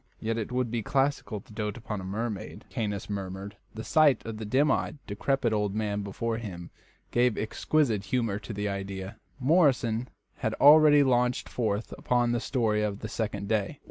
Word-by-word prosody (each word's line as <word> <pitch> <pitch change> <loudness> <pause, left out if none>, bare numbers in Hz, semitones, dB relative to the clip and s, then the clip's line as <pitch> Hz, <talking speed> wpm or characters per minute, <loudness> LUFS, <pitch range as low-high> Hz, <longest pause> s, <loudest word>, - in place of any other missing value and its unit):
"Yet 115 +1 -1
it 110 - -4
would 125 -2 -1
be 120 -1 -1
classical 135 -3 0
to 105 - -17
dote 105 +1 -3
upon 105 -4 -5
a - - -8
mermaid," 105 +2 -4
Caius 105 -3 -3
murmured. 100 0 -5 0.2
The 110 - -5
sight 150 -5 +4
of 115 -1 -5
the 110 - -5
dim 140 +6 +3
eyed, - - -1
decrepit 115 +3 0
old 105 -1 0
man 105 -1 -1
before 110 +3 -3
him 90 -6 -7 0.4
gave 120 -2 +2
exquisite 110 -2 0
humour 110 -1 0
to 115 - -8
the 105 0 -2
idea. 100 0 -5 0.2
Morrison 130 -6 +2 0.3
had - - -2
already 150 0 +7
launched 125 -2 +1
forth 110 -2 -2
upon 120 -1 +1
the 120 - +1
story 110 -4 0
of 105 -1 -2
the 110 - -5
second 105 -3 -3
day. 110 +5 -1
110 Hz, 175 wpm, -28 LUFS, 105-125 Hz, 0.4 s, already